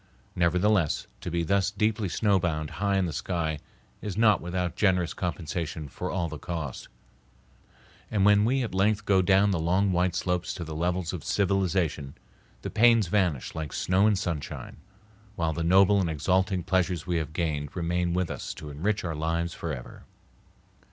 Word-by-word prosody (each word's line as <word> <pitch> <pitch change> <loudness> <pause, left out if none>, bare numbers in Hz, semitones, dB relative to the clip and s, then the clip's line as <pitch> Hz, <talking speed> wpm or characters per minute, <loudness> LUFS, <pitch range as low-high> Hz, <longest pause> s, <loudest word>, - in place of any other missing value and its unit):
Nevertheless, 90 0 +2
to 90 - -5
be 85 0 -1
thus 100 +3 +2
deeply 105 0 0
snowbound 85 -7 0
high 100 -1 +2
in 95 - +2
the 85 - -3
sky 80 -1 -2 0.4
is 105 -2 -5
not 110 -3 +4
without 90 0 -2
generous 90 -4 +2
compensation 80 -3 -4
for - - -5
all 90 -3 -1
the 80 -2 -7
cost. 80 -7 -5 1.2
And 100 -2 +1
when 105 0 +6
we 130 +4 +2
at 115 - -4
length 105 +2 +1
go 95 -2 +4
down 95 +2 +4
the 90 - 0
long 95 +4 +2
white 90 0 +1
slopes 90 -1 -1
to 90 - -5
the 80 -1 -6
levels 85 +2 -1
of 85 -6 -5
civilization, 90 -8 0 0.5
the - - -4
pains 115 -4 +4
vanish 90 -9 0
like 80 -4 -5
snow 95 +3 +2
in 105 - +3
sunshine, 85 -5 -4 0.6
while 85 -4 0
the 85 - -3
noble 95 +3 +5
and 85 - 0
exalting 90 +4 +1
pleasures 90 -2 0
we 90 -1 0
have 80 -1 -3
gained 75 -3 -2
remain 85 0 0
with 90 -2 0
us - - -5
to 75 - -8
enrich 100 +9 -1
our 85 -2 -2
lives 85 +2 -1
forever. 75 -7 -7
90 Hz, 170 wpm, -27 LUFS, 80-100 Hz, 1.2 s, when